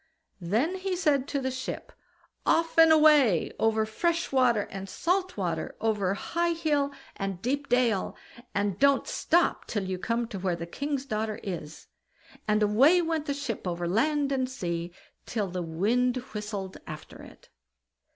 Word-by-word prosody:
Then 235 - 0
he 375 0 -2
said 290 -6 +1
to 280 - -1
the 260 -1 -2
ship: 260 0 -5 0.5
"Off 330 0 +2
and 325 0 +8
away, 300 - +5
over 220 0 +2
fresh 335 +10 -1
water 250 -5 +3
and 195 0 -6
salt 365 - -1
water, - - -2
over 205 -4 0
high 340 +10 -1
hill 295 -4 0 0.3
and 195 -2 -3
deep 280 +7 -2
dale, 240 -6 +2 0.4
and 200 -1 0
don't 280 0 +4
stop 345 +1 +1
till 205 -3 -2
you 185 -1 -3
come 230 +3 -1
to 200 - -5
where 180 -2 0
the 170 0 -5
king's 280 - -3
daughter 215 -3 -2
is." 160 -5 -6 0.6
And 210 0 +3
away 265 - +5
went 320 -2 -2
the 280 - -1
ship 250 -9 -4
over 175 0 -2
land 280 - +1
and 260 -2 0
sea, 170 -8 -3 0.4
till 210 -5 -2
the 180 0 -3
wind 225 +10 +1 0.2
whistled 205 -3 -5
after 155 0 -9
it. - - -15
235 Hz, 160 wpm, -28 LUFS, 195-290 Hz, 0.6 s, and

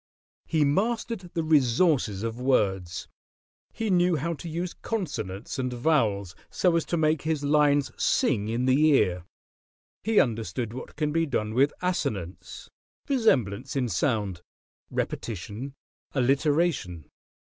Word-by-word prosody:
He 155 -3 +2
mastered 205 +4 -1
the 165 - 0
resources 140 - +2
of 115 +1 -3
words; 95 -9 0 0.6
he 220 -2 -2
knew 180 -1 +3
how 165 +3 -1
to 165 +2 -7
use 170 +2 -3
consonants 130 - -4
and 130 -1 -1
vowels 115 - +1 0.2
so 180 -2 +2
as 165 - +1
to 170 - -1
make 155 -1 +2
his 155 -2 -1
lines 145 -1 +3
sing 105 0 +2
in 120 +3 0
the 130 +3 +4
ear; 90 - +2 0.8
he 220 -1 +3
understood 115 -1 -1
what 130 - -8
can 150 -1 -1
be 165 +1 +1
done 110 -5 -1
with 135 +5 +3
assonance 100 - -3 0.4
(resemblance 135 - +1
in 130 -3 +1
sound), 100 -4 -1 0.5
repetition, 115 +6 -4 0.4
alliteration. 135 - +1
140 Hz, 125 wpm, -27 LUFS, 110-160 Hz, 0.8 s, the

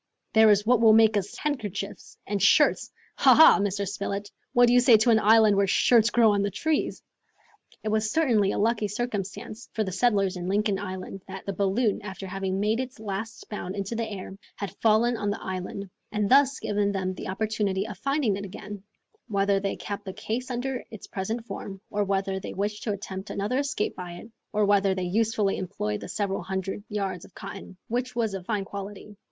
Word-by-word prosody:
There 220 0 +7
is 205 0 +4
what 240 0 +4
will 220 -1 +7
make 220 -1 +5
us 205 0 -2
handkerchiefs 210 - -4
and 200 -1 -2
shirts! - - +4 0.3
Ha, - - +6
ha, 320 - +8
Mr. 200 0 -1
Spilett, 200 +1 -4 0.2
what 245 0 +6
do 240 - +3
you 245 - +7
say 245 -2 +7
to 220 +3 +3
an 220 - +5
island 220 -1 +5
where 200 0 +3
shirts 230 +3 +4
grow 230 -3 +5
on 200 -1 +1
the 200 - 0
trees?" 310 - -1 0.8
It 215 - -1
was 215 0 +1
certainly 225 -10 +2
a - - -2
lucky 220 0 +1
circumstance 210 +1 -5
for 220 - 0
the 190 - -4
settlers 195 -2 +1
in 175 0 -5
Lincoln 200 0 +1
Island 190 0 -6
that - - -8
the 200 - -3
balloon, 200 +4 +1
after 195 -1 -7
having 190 0 -3
made 215 +3 +1
its 255 -2 -5
last 220 +2 -5
bound 190 -3 -5
into 200 +3 -3
the 230 -1 -2
air, 190 -1 -7 0.2
had 200 - -6
fallen 230 +2 +3
on 205 -1 -1
the 205 - -2
island 190 +1 -5 0.2
and 210 -1 0
thus 275 0 +5
given 205 -1 0
them 185 -1 -2
the - - -7
opportunity 205 -1 -1
of 210 - -7
finding 275 -7 +1
it 200 - -6
again, 205 +1 -8 0.5
whether 200 -2 +2
they 195 0 -2
kept 205 0 -6
the 190 - -5
case 220 +5 -4
under 255 +1 -3
its 220 - -10
present 220 +4 -4
form, 195 -2 -7
or 205 0 +1
whether 195 -1 -1
they - - -7
wished 210 +2 -2
to 220 - 0
attempt 195 0 -6
another 210 +7 -1
escape 280 -7 -1
by 180 -1 -7
it, 195 +6 -11 0.2
or 210 -1 +2
whether 200 -1 +3
they 185 - -2
usefully 210 +1 +1
employed 170 - -3
the - - -7
several 200 -2 -2
hundred 190 +1 -4
yards 195 -4 -3
of 180 - -16
cotton, 195 -1 -9
which 245 +2 -2
was 225 -4 0
of 190 -2 -6
fine 210 -3 -1
quality. 200 +1 -8
205 Hz, 205 wpm, -26 LUFS, 195-225 Hz, 0.8 s, ha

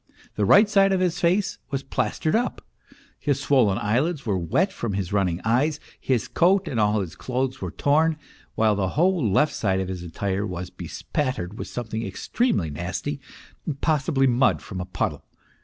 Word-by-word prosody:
The 105 - 0
right 205 - +7
side 195 -1 +4
of 190 - +2
his 180 -2 0
face 185 +4 +1
was 135 -1 -2
plastered 135 - -1
up; 245 +2 -1 0.5
his 140 -2 0
swollen 130 -9 +3
eyelids 135 +8 0
were 105 -4 +1
wet 130 - +1
from 115 -4 -3
his 95 -1 -3
running 90 -4 +1
eyes, 140 +7 +2 0.2
his 125 -5 0
coat 185 +2 +3
and 120 - -2
all 105 0 +2
his 90 -4 -6
clothes 130 +1 -2
were - - -3
torn, 155 +2 +2 0.4
while 110 -1 +3
the 95 -2 0
whole 180 -1 +3
left 150 +10 +3
side 95 -3 0
of 95 -1 -3
his 90 -2 -4
attire 95 +3 -2
was 90 -2 -5
bespattered 115 -8 -4
with - - -5
some 120 - -5
thing 110 +1 -4
extremely 100 - -1
nasty, 90 - -4 0.6
possibly 150 -3 +2
mud 130 +1 +3
from 95 -3 -6
a - - -4
puddle. 95 - -3
125 Hz, 175 wpm, -24 LUFS, 100-155 Hz, 0.6 s, right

